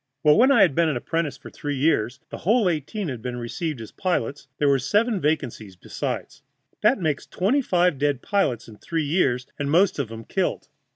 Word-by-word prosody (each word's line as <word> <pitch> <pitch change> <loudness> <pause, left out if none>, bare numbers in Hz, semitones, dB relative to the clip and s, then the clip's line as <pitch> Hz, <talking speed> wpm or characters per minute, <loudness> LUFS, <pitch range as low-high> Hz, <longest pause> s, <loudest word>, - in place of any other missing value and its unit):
Well, 150 -1 +6
when 255 +4 +5
I - - +6
had 165 - +3
been 165 +2 +2
an 145 - -1
apprentice 165 +3 -2
for - - -12
three 145 -1 -4
years 130 -4 +1
the - - -6
whole 220 +2 +3
eighteen 175 +5 -2
had 125 -6 -5
been 125 +1 -4
received 130 +4 -4
as 110 - -9
pilots, 145 - -2
and 130 - -45
there 145 - +2
were 140 -1 +4
seven 205 - +1
vacancies 125 -10 -2
besides. 90 - -5 0.4
That - - +4
makes 155 -5 -1
twenty 225 +10 +1
five 180 - +2
dead 145 -3 0
pilots 195 - 0
in 110 -2 -13
three 165 -2 -2
years, 135 -6 +1
and 140 -1 -1
most 175 +2 +3
of 125 -6 -2
'em 115 0 -7
killed. - - -2
150 Hz, 210 wpm, -24 LUFS, 130-180 Hz, 0.4 s, Well